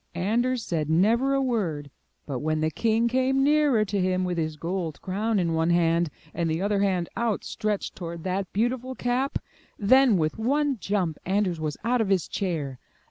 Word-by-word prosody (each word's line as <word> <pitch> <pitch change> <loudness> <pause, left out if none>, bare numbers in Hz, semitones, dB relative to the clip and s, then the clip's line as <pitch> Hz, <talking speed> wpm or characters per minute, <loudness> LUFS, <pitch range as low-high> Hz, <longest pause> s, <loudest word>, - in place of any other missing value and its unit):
Anders 235 +7 0
said 155 -3 -2
never 230 +11 +3
a 275 - +2
word 170 - -2 0.3
but 135 -4 -3
when 155 +2 -1
the 155 0 0
king 225 +3 +1
came 260 +2 +2
nearer 290 -6 +3
to 200 -1 -1
him 185 0 +1
with 180 -2 -1
his 155 -1 -2
gold 165 -1 -3
crown 210 +4 -1
in 170 -3 +1
one 160 +1 +1
hand, 170 -1 +2 0.2
and 170 -1 -1
the 160 +1 -1
other 200 +1 +1
hand 185 -4 +1
out 230 -3 -1
stretched 210 -2 -3
toward 170 -2 -6
that 185 0 -2
beautiful 245 +4 -1
cap, 250 +3 0 0.4
then, 250 +1 +5
with 155 +4 -1
one 275 +2 +1
jump, 185 -6 -1
Anders 190 -3 0
was 155 -2 -3
out 240 +1 +2
of 210 - 0
his 190 -4 +2
chair. 150 -9 -3
195 Hz, 185 wpm, -26 LUFS, 165-235 Hz, 0.4 s, then